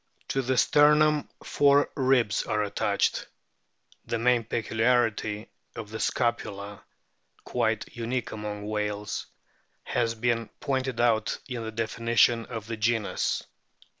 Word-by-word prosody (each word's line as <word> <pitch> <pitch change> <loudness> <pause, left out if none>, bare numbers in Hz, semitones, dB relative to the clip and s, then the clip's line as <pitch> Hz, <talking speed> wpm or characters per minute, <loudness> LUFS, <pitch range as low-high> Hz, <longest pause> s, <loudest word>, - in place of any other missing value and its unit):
To 135 - +1
the 130 0 0
sternum 150 +2 +4
four 145 0 +3
ribs 130 -5 +2
are 105 -1 -1
attached. 105 0 0 0.8
The 115 - -1
main 120 0 +3
peculiarity 110 -1 0 0.2
of 110 -2 -7
the 110 - -5
scapula 105 -4 -2 0.6
(quite - - 0
unique 120 +1 -3
among 105 -1 -5
whales) 105 -1 -3 0.6
has 115 -1 0
been 115 -1 0
pointed 130 -3 -2
out 115 -2 +2
in 125 -3 -4
the 110 - -5
definition 115 +1 +2
of 115 -3 -6
the 115 0 -5
genus. 110 -1 0
115 Hz, 115 wpm, -27 LUFS, 110-125 Hz, 0.8 s, sternum